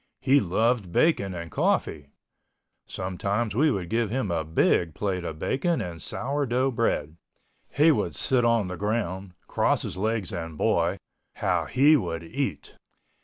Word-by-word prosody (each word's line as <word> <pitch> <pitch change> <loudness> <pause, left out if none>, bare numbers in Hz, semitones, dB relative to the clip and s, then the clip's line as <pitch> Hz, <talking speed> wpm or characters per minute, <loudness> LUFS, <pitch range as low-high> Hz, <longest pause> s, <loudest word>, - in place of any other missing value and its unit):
He 140 +1 +4
loved 110 0 0
bacon 100 - +2
and 85 -1 -7
coffee. 75 -3 0 0.8
Sometimes 100 +4 -2
we 150 +8 +3
would 95 -10 -2
give 115 +3 0
him 115 -4 -2
a 80 -2 0
big 80 +1 +1
plate 95 -3 -2
of 80 -2 -5
bacon 160 - 0
and 85 -3 -6
sour 140 - -2
dough 130 +3 +1
bread. 85 - -1 0.5
He 155 +3 +4
would - - -1
sit 130 -2 +2
on 115 -4 +2
the 90 0 -5
ground, 95 -3 -3
cross - - +1
his - - -5
legs 110 -1 -1
and 80 -2 -5
boy, 85 +5 +1 0.4
how - - 0
he 145 +4 +5
would 85 - -4
eat! 100 - -4
100 Hz, 155 wpm, -26 LUFS, 85-125 Hz, 0.8 s, he